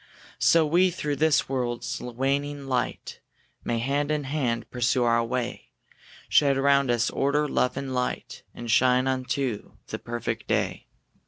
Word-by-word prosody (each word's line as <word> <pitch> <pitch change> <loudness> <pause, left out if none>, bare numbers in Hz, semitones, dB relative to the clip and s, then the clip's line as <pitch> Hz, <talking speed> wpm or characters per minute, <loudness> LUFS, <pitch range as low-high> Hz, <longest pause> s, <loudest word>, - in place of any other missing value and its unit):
So 165 -1 +5
we 175 +5 +4
through 150 -5 -3
this 155 0 +3
world's 125 -3 -3
waning 140 +3 -2
night 130 -2 -2 0.4
May, 120 - -1
hand 140 +5 0
in 150 -1 0
hand, 135 -5 -2
pursue 120 0 +1
our 115 0 +3
way; 125 +1 -4 0.6
Shed 140 -2 +4
round 140 -1 +3
us 120 -1 +1
order, 145 +2 +1
love, 125 -2 0
and 135 -1 -4
light, 125 0 -3
And 120 -1 -5
shine 125 +1 +4
unto 130 -3 -2 0.2
the - - -4
perfect 120 0 -4
day. - - -1
130 Hz, 145 wpm, -26 LUFS, 120-145 Hz, 0.6 s, So